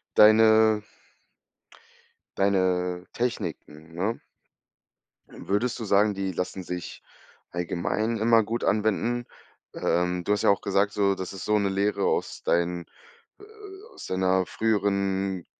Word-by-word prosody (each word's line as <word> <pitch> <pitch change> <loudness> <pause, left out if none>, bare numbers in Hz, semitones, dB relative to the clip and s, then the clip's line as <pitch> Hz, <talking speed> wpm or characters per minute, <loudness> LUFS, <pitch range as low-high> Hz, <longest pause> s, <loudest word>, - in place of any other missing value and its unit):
deine 110 0 +6 1.6
deine 90 -2 +1
Techniken, 80 -9 -4
ne? 105 +6 -2 1.1
Würdest 110 +6 -2
du 115 - -5
sagen, 105 +1 +3
die 95 -1 -3
lassen 90 +2 -4
sich 90 -1 -7 0.5
allgemein 90 +6 -2
immer 115 +1 +4
gut 115 +3 -3
anwenden? 110 +3 0 0.5
Ähm, 90 0 0
du - - +1
hast 105 - 0
ja - - +4
auch 100 - +1
gesagt 100 +1 +1
so, 100 -1 +2
das 95 -1 -6
ist 95 - -7
so 105 0 +2
'ne 100 -1 0
Lehre 100 +1 0
aus - - -2
dein 85 0 0 0.9
äh, - - -11 0.2
aus - - -10
deiner 95 0 +1
früheren 100 -4 -1
100 Hz, 125 wpm, -26 LUFS, 90-110 Hz, 1.6 s, deine